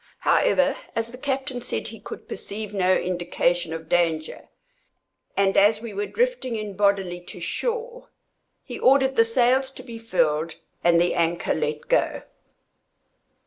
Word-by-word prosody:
However, 275 0 +3 0.2
as 230 0 -2
the 250 - -9
captain 265 -2 -2
said - - -3
he - - -10
could - - -9
perceive 210 0 -6
no 185 -2 +3
indication 175 -1 0
of 160 0 -6
danger, 160 -2 0 0.9
and 195 -1 +3
as 210 +2 +5
we 225 -1 -7
were 205 +1 -2
drifting 475 - -1
in 210 -2 -5
bodily 195 -3 +1
to - - -10
shore, 480 +1 -3 0.6
he - - -7
ordered 265 0 +4
the 230 - +6
sails 250 +3 +2
to 260 -1 -12
be 235 -3 -9
furled, 165 -7 0 0.3
and 170 -1 +5
the 175 +1 +2
anchor 170 +1 0
let 150 -1 -2
go. - - +1
205 Hz, 145 wpm, -24 LUFS, 175-260 Hz, 0.9 s, the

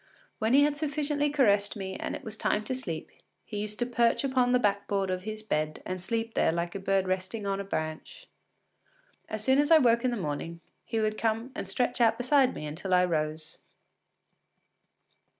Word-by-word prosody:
When 225 +2 +2
he 285 - +7
had 295 0 +1
sufficiently 295 -1 0
caressed 205 -9 +2
me 190 -2 -5
and - - -4
it - - -9
was 220 -1 -7
time 215 0 0
to 260 - -3
sleep 175 -12 -5 0.3
he 210 - -5
used 210 0 -3
to 240 - 0
perch 235 0 +2
upon 260 -2 +2
the 250 - +5
backboard 200 -3 0
of 185 +1 -3
his 215 0 -5
bed 155 -7 -2
and 185 0 -4
slept 225 +3 -2
there - - +2
like 170 +1 -2
a 195 - -4
bird 195 -1 +1
roosting 185 +3 -2
on 195 0 -1
a - - -2
branch. 160 - -5 1.0
As 215 -1 -4
soon 265 +3 +4
as 290 - +3
I 325 - +8
woke 235 -4 +4
in 255 - +2
the 240 - -2
morning, 165 0 -4 0.3
he 225 - -2
would 215 0 0
come 225 +3 -1
and 195 - -5
stretch 245 +4 0
out 225 -1 +4
beside 255 +1 +3
me 150 - -6
until 175 +5 -1
I 180 0 +5
rose. 155 -2 -3
215 Hz, 200 wpm, -29 LUFS, 185-250 Hz, 1.0 s, I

